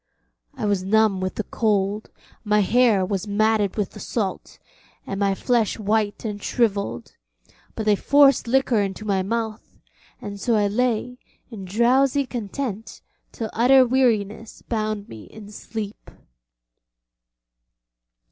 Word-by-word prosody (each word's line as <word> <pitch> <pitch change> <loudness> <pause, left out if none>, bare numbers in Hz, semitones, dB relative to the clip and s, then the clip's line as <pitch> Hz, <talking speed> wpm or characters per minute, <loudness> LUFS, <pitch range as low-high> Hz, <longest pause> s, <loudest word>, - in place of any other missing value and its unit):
I - - -4
was 200 -2 +1
numb 205 0 +2
with 185 0 -3
the 215 - -2
cold, 205 -1 -1 0.3
my 210 -1 +2
hair 220 -2 +3
was 195 +1 -3
matted 210 -1 +1
with 205 -3 -1
the - - -11
salt, 200 -5 -4 0.5
and 195 - -5
my 200 -1 +1
flesh 235 -1 0
white 215 0 -1
and 205 -2 -4
shrivelled, 205 -5 -1 0.6
but 220 - -4
they 210 -1 +4
forced 280 +3 +4
liquor 250 -3 +2
into 195 +1 -4
my 195 -2 +1
mouth, 220 +2 -4 0.4
and 200 -1 -7
so 230 +3 +1
I 210 -1 +2
lay 245 +3 -1 0.3
in 200 -4 -8
drowsy 255 +7 +2
content 225 -2 -5 0.3
till 220 -2 -5
utter 255 +3 +5
weariness 225 -4 0
bound 215 -2 -3
me 110 -2 -11
in 210 -1 -12
sleep. 210 0 -7
215 Hz, 130 wpm, -23 LUFS, 200-235 Hz, 0.6 s, utter